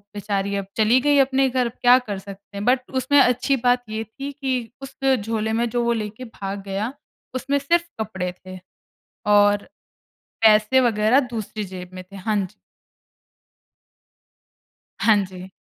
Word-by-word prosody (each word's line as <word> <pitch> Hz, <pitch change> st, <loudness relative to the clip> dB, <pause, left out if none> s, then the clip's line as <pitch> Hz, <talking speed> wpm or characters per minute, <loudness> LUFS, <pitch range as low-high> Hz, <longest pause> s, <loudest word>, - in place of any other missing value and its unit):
बेचारी, 200 Hz, -1 st, -2 dB
अब 200 Hz, -1 st, -2 dB
चली 225 Hz, +4 st, +4 dB
गईं 290 Hz, -1 st, +4 dB
अपने 265 Hz, 0 st, +2 dB
घर, 250 Hz, -1 st, +1 dB
अब -, -, -6 dB
क्या 245 Hz, +1 st, +7 dB
कर 210 Hz, -6 st, -5 dB
सकते 200 Hz, +1 st, -11 dB
हैं? 200 Hz, -, -4 dB
बट 255 Hz, 0 st, +2 dB
उसमें 285 Hz, +3 st, +4 dB
अच्छी 250 Hz, +2 st, +2 dB
बात 245 Hz, 0 st, +3 dB
ये 220 Hz, +1 st, -3 dB
थी 275 Hz, +6 st, -7 dB
कि 260 Hz, -5 st, -3 dB
उस 270 Hz, 0 st, -9 dB, 0.2 s
झोले 220 Hz, +1 st, -2 dB
में, 235 Hz, +1 st, 0 dB
जो 240 Hz, +1 st, 0 dB
वो 235 Hz, 0 st, +2 dB
लेके 215 Hz, +4 st, -7 dB
भाग 200 Hz, -3 st, -6 dB
गया, 200 Hz, +6 st, -3 dB, 0.4 s
उसमें 275 Hz, +3 st, 0 dB
सिर्फ़ 340 Hz, +5 st, +1 dB
कपड़े 180 Hz, -4 st, -3 dB
थे 185 Hz, 0 st, -8 dB, 0.8 s
और 205 Hz, 0 st, +3 dB, 0.7 s
पैसे 215 Hz, +4 st, +5 dB
वग़ैरह 225 Hz, +2 st, +3 dB
दूसरी 215 Hz, -2 st, -4 dB
जेब 180 Hz, -1 st, -8 dB
में 185 Hz, -, -7 dB
थे, 195 Hz, +2 st, -13 dB
हाँ 210 Hz, +3 st, -1 dB
जी। -, -, -22 dB, 2.4 s
हाँ 215 Hz, +2 st, +5 dB
जी। 185 Hz, 0 st, -10 dB
220 Hz, 155 wpm, -22 LUFS, 200-255 Hz, 2.4 s, क्या